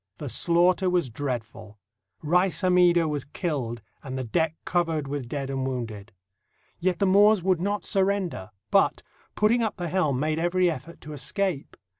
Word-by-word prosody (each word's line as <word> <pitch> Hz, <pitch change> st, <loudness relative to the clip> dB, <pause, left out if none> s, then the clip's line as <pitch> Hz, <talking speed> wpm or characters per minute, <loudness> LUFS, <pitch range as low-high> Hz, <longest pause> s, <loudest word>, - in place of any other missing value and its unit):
The 145 Hz, -, -6 dB
slaughter 180 Hz, +5 st, +2 dB
was 175 Hz, -8 st, 0 dB
dreadful. 110 Hz, -5 st, -5 dB, 0.5 s
Rais 175 Hz, +1 st, +2 dB
Hammida 180 Hz, -2 st, +4 dB
was 145 Hz, -3 st, -2 dB
killed 135 Hz, -, -4 dB, 0.2 s
and 130 Hz, -1 st, -6 dB
the 130 Hz, -, -2 dB
deck 160 Hz, +6 st, 0 dB
covered 165 Hz, -5 st, 0 dB
with 140 Hz, -3 st, -4 dB
dead 135 Hz, -1 st, -3 dB
and 135 Hz, -1 st, -2 dB
wounded. 115 Hz, -5 st, -5 dB, 0.7 s
Yet 180 Hz, 0 st, 0 dB
the 200 Hz, -, +1 dB
Moors 200 Hz, 0 st, +5 dB
would 185 Hz, -2 st, +1 dB
not 205 Hz, +2 st, -2 dB
surrender, 195 Hz, -, 0 dB, 0.2 s
but, -, -, +3 dB, 0.3 s
putting 225 Hz, +3 st, +3 dB
up 220 Hz, -2 st, -1 dB
the 175 Hz, -2 st, -3 dB
helm, 155 Hz, -8 st, +1 dB
made 155 Hz, +2 st, 0 dB
every 175 Hz, +1 st, +2 dB
effort 165 Hz, +3 st, -9 dB
to 150 Hz, -, -8 dB
escape. 150 Hz, +3 st, -2 dB
165 Hz, 160 wpm, -26 LUFS, 135-185 Hz, 0.7 s, Moors